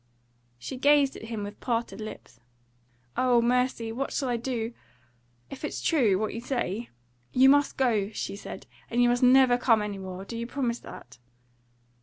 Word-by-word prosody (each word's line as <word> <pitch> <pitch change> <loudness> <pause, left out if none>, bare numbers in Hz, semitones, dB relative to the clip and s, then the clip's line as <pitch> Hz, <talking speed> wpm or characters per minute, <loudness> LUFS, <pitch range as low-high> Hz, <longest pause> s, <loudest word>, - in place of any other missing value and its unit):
She 190 - -7
gazed 285 0 +4
at - - -9
him 225 -2 -4
with 205 0 -8
parted 230 -2 -2
lips. 215 - -9 0.8
"Oh, 250 -2 +3
mercy! 240 -1 +1
What 265 +4 -3
shall 270 -3 -1
I 240 - +1
do? 235 -1 -3 0.8
If 275 - -9
it's - - -3
true 240 - +3
what 215 +1 -2
you 230 - -5
say 240 -3 -3 0.4
you 260 +1 +6
must 285 +1 +3
go!" 220 -7 +1
she 210 - -5
said. 200 - -9 0.2
"And 240 +1 +2
you 240 - +4
must 245 0 +1
never 255 -1 +6
come 230 -4 +3
any 205 -2 -5
more. 190 0 -7
Do 230 - -7
you 235 - -4
promise 245 -3 -2
that?" 120 0 -12
240 Hz, 175 wpm, -27 LUFS, 215-255 Hz, 0.8 s, you